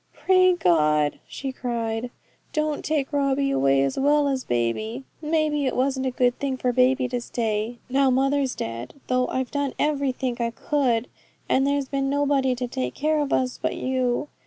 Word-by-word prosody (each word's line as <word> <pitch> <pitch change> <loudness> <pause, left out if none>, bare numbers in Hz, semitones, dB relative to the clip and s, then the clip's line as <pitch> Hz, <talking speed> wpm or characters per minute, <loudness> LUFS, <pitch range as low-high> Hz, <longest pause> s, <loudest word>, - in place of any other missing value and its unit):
'Pray 370 -1 +4
God,' 150 - +2
she 270 -1 -5
cried, 235 -2 -3 0.4
'don't 305 -2 -1
take 300 -2 -1
Robbie 275 -1 +1
away 135 - +3
as 135 - -1
well 290 +1 +3
as 265 -2 -1
baby. 125 - -2 0.2
Maybe 305 -2 +1
it 255 - -1
wasn't 265 0 0
a - - +2
good 250 -1 +1
thing 270 -2 -2
for 250 -1 0
baby 255 +1 +3
to 245 0 -2
stay, 225 0 -2
now 270 +1 +3
mother's 270 +1 +1
dead, 115 +2 -5
though 255 0 +1
I've 260 -1 -2
done 285 -2 -2
everythink 265 -4 -1
I 235 - +1
could, 245 -1 0 0.4
and 270 +1 +2
there's 280 -1 0
been 275 -1 -1
nobody 280 -2 +2
to 250 0 -3
take 130 - -3
care 310 +1 +1
of 290 -2 -1
us 255 -1 0
but - - -1
You. 255 +1 -1
260 Hz, 175 wpm, -24 LUFS, 240-280 Hz, 0.4 s, Pray